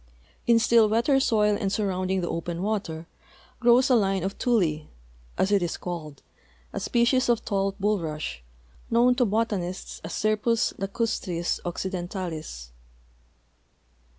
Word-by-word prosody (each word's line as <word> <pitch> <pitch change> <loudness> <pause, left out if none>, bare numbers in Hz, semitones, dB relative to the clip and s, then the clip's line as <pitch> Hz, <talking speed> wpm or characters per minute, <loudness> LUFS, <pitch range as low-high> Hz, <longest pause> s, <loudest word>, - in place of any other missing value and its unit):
In 235 -1 +6
still 230 -1 +4
wetter 235 +5 +3
soil 210 -5 +3
and 195 - 0
surrounding 190 -2 0
the 175 - -2
open 170 +1 -3
water 190 -6 -2 0.5
grows 245 +1 +5
a - - +6
line 195 -4 +1
of 195 +1 -2
tule, 175 - +1 0.5
as 190 - +1
it 200 -2 +4
is 175 - -2
called, 155 -5 -7 0.5
a - - -2
species 245 +2 +2
of 235 -1 +1
tall 195 -1 0
bulrush, 165 - -2 0.5
known 240 +2 +4
to 250 0 +2
botanists 205 -4 -2
as 165 - -6
Scirpus 215 +2 +1
lacastris 195 -4 -2
occidentalis. 175 - -5
195 Hz, 125 wpm, -26 LUFS, 175-230 Hz, 0.5 s, In